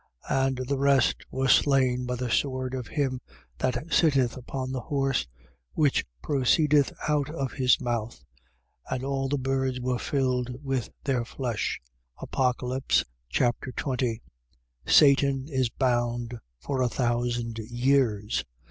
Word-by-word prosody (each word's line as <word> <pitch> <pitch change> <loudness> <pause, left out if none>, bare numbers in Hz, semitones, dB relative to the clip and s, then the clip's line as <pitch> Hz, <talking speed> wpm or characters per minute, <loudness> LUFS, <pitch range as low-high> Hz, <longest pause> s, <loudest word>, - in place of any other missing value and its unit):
19:21. 135 0 +3
And 130 -1 -2
the 140 +1 0
rest 140 -2 +4
were 135 0 -1
slain 130 -2 +3
by 125 - -1
the 125 -1 -3
sword 130 -1 0
of 130 -3 -4
him 135 -4 -1 0.4
that 130 0 0 0.2
sitteth 135 -7 +3
upon 130 0 -5
the 130 - -2
horse, 135 - 0 0.5
which 145 -3 +2 0.2
proceedeth 145 +1 +3 0.2
out 150 -2 +1
of 140 -5 -3
his 130 -3 +3
mouth: 115 - -3 0.7
and 130 0 -2
all 135 0 -1
the 145 - +1
birds 130 -1 -1
were 125 0 -1
filled 125 -3 -1
with 135 -4 -2
their 130 -4 0
flesh. 120 -3 -3 0.4
Apocalypse 130 0 0 0.3
Chapter 125 +2 0
20 125 -4 -2 0.6
Satan 140 -2 +5
is 130 -5 0
bound 120 -2 -1 0.2
for 130 - -2
a 125 - +2
thousand 120 -1 -1
years. 120 -2 +1
130 Hz, 130 wpm, -27 LUFS, 120-135 Hz, 0.7 s, Satan